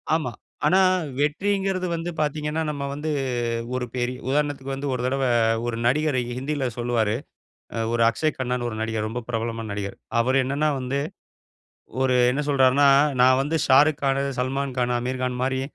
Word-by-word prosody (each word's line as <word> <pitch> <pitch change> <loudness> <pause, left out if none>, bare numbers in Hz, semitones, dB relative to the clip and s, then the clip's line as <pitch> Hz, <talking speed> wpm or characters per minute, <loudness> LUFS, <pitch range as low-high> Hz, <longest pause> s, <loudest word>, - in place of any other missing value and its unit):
ஆமா. 150 -7 -1 0.3
ஆனா, 185 +5 +5 0.4
வெற்றிங்கறது 190 +4 0
வந்து 165 +1 -3
பாத்தீங்கனா, 150 +1 -1
நம்ம 145 -2 -4
வந்து 150 +2 -4 0.7
ஒரு 125 -1 -1
பெரி 125 0 -1 0.2
உதாரணத்துக்கு 140 -1 -1
வந்து 140 +1 -4
ஒரு 125 - -2
தடவ 135 +1 0 0.4
ஒரு 120 - -2
நடிகர் 145 +2 +2 0.2
ஹிந்தியில 140 0 -2
சொல்லுவாரு. 115 -3 0 0.8
ஒரு 115 0 +2
அக்க்ஷை 155 +7 +1
கண்ணானு 125 -1 -1
ஒரு 110 - -5
நடிகர் 110 -1 -2
ரொம்ப 120 +3 -4
பிரபலமான 115 -1 -3
நடிகர். 100 -1 -4 0.2
அவர் 130 +3 +2
என்னனா 140 +4 0
வந்து, 130 +2 -2 1.0
ஒரு 130 -1 +3 0.2
என்ன 145 +3 -1
சொல்றாருனா, 140 +1 +4 0.3
நா 125 - +7
வந்து 155 +4 0
ஷாருக் 145 +3 +5
கானு, 135 0 +1 0.2
சல்மான்கானு, 130 -1 -1
அமீர்கான் 125 0 -2
மாரி 130 0 0
135 Hz, 145 wpm, -24 LUFS, 125-150 Hz, 1.0 s, நா